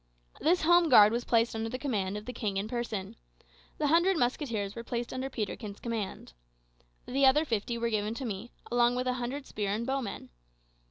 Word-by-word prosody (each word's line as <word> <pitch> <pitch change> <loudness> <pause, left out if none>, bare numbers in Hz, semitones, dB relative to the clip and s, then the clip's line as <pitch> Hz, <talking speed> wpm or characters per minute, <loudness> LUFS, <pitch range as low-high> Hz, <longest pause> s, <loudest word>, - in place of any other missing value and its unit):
This 345 +2 +2
home 345 0 +5
guard 210 -5 +8
was 240 +1 -2
placed 230 -1 +2
under 225 +3 -3
command 210 -8 -2
of 210 - -8
the 250 - -6
king 205 -5 -2
in 200 +2 -1
person. 225 -5 -4 0.6
The - - 0
hundred 340 +5 +4
musketeers 240 -6 -1
were 230 - -6
placed 235 0 -4
under 260 +1 -3
Peterkin's 210 -3 -5
command. 220 - -4 0.7
The 270 +1 +3
other 300 +4 +4
fifty 235 -2 -2
were 235 0 -1
given 215 +1 -1
to 265 - -5
me, 215 +1 -5 0.2
along 240 0 +3
with 250 0 -1
a 255 - +1
hundred 265 +4 -4
spear 205 -5 -3
and 220 +3 -1
bow 270 +1 0
men. 205 - -7
235 Hz, 195 wpm, -30 LUFS, 215-265 Hz, 0.7 s, guard